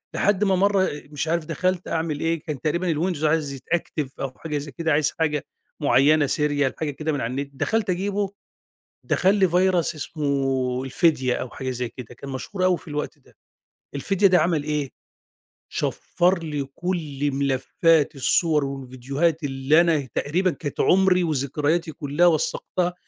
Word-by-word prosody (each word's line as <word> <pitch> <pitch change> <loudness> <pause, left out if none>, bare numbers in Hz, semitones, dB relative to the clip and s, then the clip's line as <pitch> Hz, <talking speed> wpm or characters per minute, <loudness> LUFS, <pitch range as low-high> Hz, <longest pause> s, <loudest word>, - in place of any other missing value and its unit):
لحد 205 0 +2
ما 195 -2 +3
مرّه 195 0 +3 0.2
مش 150 +1 -3
عارف 165 0 0
دخلت 180 +2 -1
أعمل 160 -2 -2
إيه 165 +1 0
كان 145 -5 -5
تقريبًا 170 +4 0
الwindows 160 0 -1
عايز 150 -2 +1
يتأكتف 145 0 -3
أو 135 - -3
حاجة 155 -2 -3
زي 145 0 -6
كده، 165 +5 -1
عايز 150 0 +2
حاجة 150 -3 0 0.3
معينة 145 +2 +4
سيريال 145 -1 +1
حاجة 155 -2 -2
كده 155 +3 -3
من 145 - -2
على 115 - -2
النت 140 +2 -3
دخلت 215 +9 -1
أجيبُه، 195 +2 -1 0.7
دخل 190 +2 +2
لي 195 -2 +4
virus 185 +2 +3 0.2
اسمه 135 -4 -1
الفدية 135 -2 +2
أو 125 - -4
حاجة 130 +2 -5
زي 125 -1 -3
كده، 120 -1 -10
كان 140 - -9
مشهور 185 - -3
أوي 185 -1 +3
في - - -18
الوقت 150 -1 -4
ده، - - -24 0.6
الفدية 195 +8 +2
ده 185 -2 +5
عمل 160 -2 +1
إيه، 150 -3 -2 0.8
شَفَّر 180 +1 0
لي 150 -3 -2
كُلّ 150 -6 -2
ملفات 140 +3 +2
الصور 150 +2 +2
والفيديوهات 135 +4 -2
اللي 135 +3 +3
أنا 160 -6 +1
تقريبًا 180 +6 +1
كانت 145 -4 -6
عمري 185 -1 +4
وذكرياتي 150 +2 0
كلّها 150 +2 +1
وثّقتها 175 +2 0
155 Hz, 160 wpm, -24 LUFS, 140-175 Hz, 0.8 s, ده